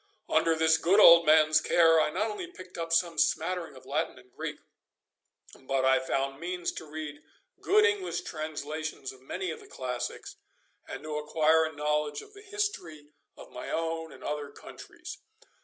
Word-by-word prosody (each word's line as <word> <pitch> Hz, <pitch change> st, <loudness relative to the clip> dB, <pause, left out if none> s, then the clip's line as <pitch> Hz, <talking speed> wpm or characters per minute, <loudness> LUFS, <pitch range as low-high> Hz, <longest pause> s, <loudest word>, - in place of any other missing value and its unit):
Under 160 Hz, +1 st, +2 dB
this 160 Hz, 0 st, +4 dB
good 190 Hz, +5 st, +4 dB
old 170 Hz, -4 st, +9 dB
man's 155 Hz, 0 st, +5 dB
care 165 Hz, -2 st, +5 dB
I -, -, +1 dB
not 215 Hz, +8 st, -1 dB
only 210 Hz, +12 st, -6 dB
picked 185 Hz, -, -13 dB
up 165 Hz, -1 st, -4 dB
some 165 Hz, -1 st, +2 dB
smattering 165 Hz, +1 st, 0 dB
of 130 Hz, 0 st, -14 dB
Latin 145 Hz, +1 st, -2 dB
and 125 Hz, -1 st, -19 dB
Greek, -, -, -5 dB, 1.0 s
but 135 Hz, 0 st, -2 dB
I 130 Hz, 0 st, +5 dB
found 135 Hz, +1 st, -2 dB
means 175 Hz, +1 st, -3 dB
to 160 Hz, -, -9 dB
read 150 Hz, -1 st, -7 dB, 0.4 s
good 425 Hz, +2 st, +4 dB
English 415 Hz, -4 st, 0 dB
translations 155 Hz, -2 st, -5 dB
of 130 Hz, -, -18 dB
many 180 Hz, +6 st, -4 dB
of -, -, -7 dB
the -, -, -15 dB
classics, 125 Hz, -2 st, -5 dB, 0.5 s
and -, -, -7 dB
to 155 Hz, -1 st, -4 dB
acquire 160 Hz, +1 st, +3 dB
a 160 Hz, -, -4 dB
knowledge 150 Hz, 0 st, -1 dB
of -, -, -18 dB
the 405 Hz, -, -13 dB
history 390 Hz, -, -4 dB, 0.3 s
of -, -, -13 dB
my -, -, -7 dB
own 165 Hz, 0 st, -3 dB
and -, -, -14 dB
other 150 Hz, -1 st, -3 dB
countries. -, -, -11 dB
160 Hz, 175 wpm, -29 LUFS, 150-170 Hz, 1.0 s, old